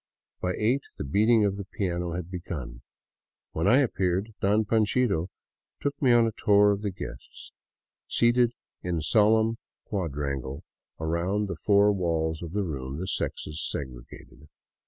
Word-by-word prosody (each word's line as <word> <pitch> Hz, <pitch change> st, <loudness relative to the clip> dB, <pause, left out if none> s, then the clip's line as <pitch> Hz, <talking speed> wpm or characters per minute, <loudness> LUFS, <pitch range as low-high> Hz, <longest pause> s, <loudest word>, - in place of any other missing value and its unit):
By 90 Hz, 0 st, -1 dB
eight 120 Hz, +6 st, +2 dB, 0.2 s
the -, -, -3 dB
beating 105 Hz, -, +3 dB
of 100 Hz, -1 st, 0 dB
the 100 Hz, -, -4 dB
piano 90 Hz, -3 st, -3 dB
had 90 Hz, 0 st, -5 dB
begun. 75 Hz, -9 st, -6 dB, 0.7 s
When 80 Hz, +4 st, -1 dB
I 120 Hz, +5 st, +6 dB
appeared, 100 Hz, -3 st, 0 dB
" -, -, -45 dB
Don 105 Hz, +2 st, +3 dB
Panchito 105 Hz, -4 st, +1 dB, 0.2 s
" -, -, -66 dB
took 145 Hz, +1 st, -3 dB
me 130 Hz, -3 st, +4 dB
on 120 Hz, -1 st, +6 dB
a 115 Hz, -, 0 dB
tour 105 Hz, -1 st, +4 dB
of 100 Hz, 0 st, -1 dB
the 105 Hz, -, -1 dB
guests, 95 Hz, -, -9 dB, 0.6 s
seated 120 Hz, 0 st, +3 dB, 0.3 s
in 85 Hz, -3 st, -2 dB
solemn 110 Hz, +6 st, +3 dB, 0.3 s
quadrangle 70 Hz, -, -3 dB, 0.4 s
around 85 Hz, +6 st, 0 dB
the 95 Hz, -, -4 dB
four 100 Hz, 0 st, +4 dB
walls 80 Hz, -4 st, -1 dB
of 85 Hz, -2 st, -6 dB
the 105 Hz, 0 st, 0 dB
room, 70 Hz, -5 st, -5 dB
the 90 Hz, -, -4 dB
sexes 75 Hz, -3 st, -2 dB
segregated. 65 Hz, +2 st, -6 dB
95 Hz, 155 wpm, -27 LUFS, 80-110 Hz, 0.7 s, I